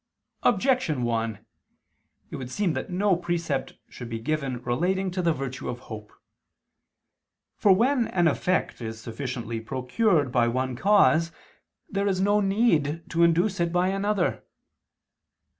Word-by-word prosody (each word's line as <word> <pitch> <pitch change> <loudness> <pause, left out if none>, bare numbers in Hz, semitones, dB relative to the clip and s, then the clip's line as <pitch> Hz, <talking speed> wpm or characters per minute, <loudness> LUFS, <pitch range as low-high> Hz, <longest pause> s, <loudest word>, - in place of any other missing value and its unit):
Objection 195 - +2
1: 115 -2 -2 0.9
It - - -5
would 130 -2 -6
seem 185 +3 0
that - - -4
no 190 +1 +2
precept 170 -5 -2
should 120 -2 -9
be 115 - -3
given 135 0 -2
relating 185 +10 0
to 180 +1 -2
the 170 -1 +2
virtue 135 -3 -4
of 120 - -4
hope. 110 -4 -10 1.4
For 205 - +4
when 240 +5 +3
an 175 -2 +2
effect 180 -2 0
is 110 -1 -5
sufficiently 115 -1 -5
procured 135 - 0
by 120 -1 +3
one 130 +1 -1
cause, 170 -1 +4 0.6
there 200 0 -1
is 190 -2 0
no 205 +2 +3
need 170 -7 +1
to 170 - 0
induce 175 +4 +3
it 170 -1 +1
by 180 +1 +2
another. 195 -1 0
165 Hz, 140 wpm, -26 LUFS, 125-190 Hz, 1.4 s, For